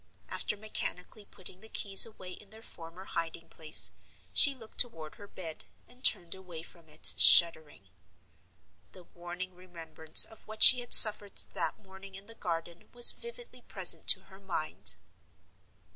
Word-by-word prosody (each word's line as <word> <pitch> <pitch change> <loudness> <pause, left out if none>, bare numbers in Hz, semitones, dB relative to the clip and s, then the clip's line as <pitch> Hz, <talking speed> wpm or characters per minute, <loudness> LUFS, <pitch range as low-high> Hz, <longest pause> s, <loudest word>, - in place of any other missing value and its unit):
After 210 - -7
mechanically 205 -1 -9
putting 185 -1 -14
the 220 - -15
keys 195 0 0
away 190 -5 -15
in 200 +2 -17
their 220 +1 -18
former 170 +1 -12
hiding 165 -1 -9
place, 155 -1 -1 0.4
she 280 -1 +1
looked 225 -4 -19
toward 160 -10 -1
her 205 - -18
bed, 165 -5 -12 0.2
and 250 +1 -23
turned 170 -1 +1
away 180 -4 -14
from 170 -2 -17
it, - - +1
shuddering. 155 - +3 1.0
The 185 - -18
warning 175 +2 -13
remembrance 165 -3 +2
of 220 - -20
what 215 0 0
she 255 - +8
had 245 - +5
suffered 210 -2 +6 0.2
that - - -7
morning 190 -1 -18
in 195 +1 -15
the 230 - -15
garden 170 -4 -10
was 240 0 +4
vividly 475 +1 -14
present - - -1
to - - +3
her 190 0 -22
mind. 180 -5 -5
185 Hz, 155 wpm, -26 LUFS, 170-215 Hz, 1.0 s, she